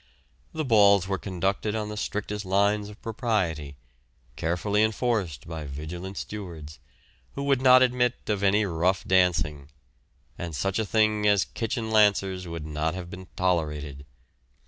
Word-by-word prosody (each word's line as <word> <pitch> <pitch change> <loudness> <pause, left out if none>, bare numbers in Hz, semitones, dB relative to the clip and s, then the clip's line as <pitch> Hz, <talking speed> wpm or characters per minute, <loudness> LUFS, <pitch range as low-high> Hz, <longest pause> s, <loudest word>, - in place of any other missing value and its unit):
The 155 -1 -3
balls 100 -5 +5
were 95 -1 -1
conducted 100 +3 -2
on 105 -1 -3
the 105 - -5
strictest 105 0 -3
lines 100 +2 +1
of 105 - -13
propriety, 95 - -2 0.6
carefully 90 - 0
enforced 110 - -1
by 80 -2 -6
vigilant 85 +7 -7
stewards, 85 -8 -7 0.6
who 140 - -3
would 140 -2 +2
not 130 -1 +7
admit 125 -1 +2
of 105 -2 -1
any 100 +1 +3
rough 90 +1 0
dancing; 85 -6 +1 0.7
and 85 -3 -5
such 95 +6 -1
a 110 - -1
thing 110 -1 +2
as 100 -2 +4
kitchen 115 -1 -3
lancers 100 -4 +3
would 85 -2 -6
not 80 +2 -2
have 90 -1 -7
been 95 0 -9
tolerated. 75 -6 -1
95 Hz, 145 wpm, -26 LUFS, 85-110 Hz, 0.7 s, not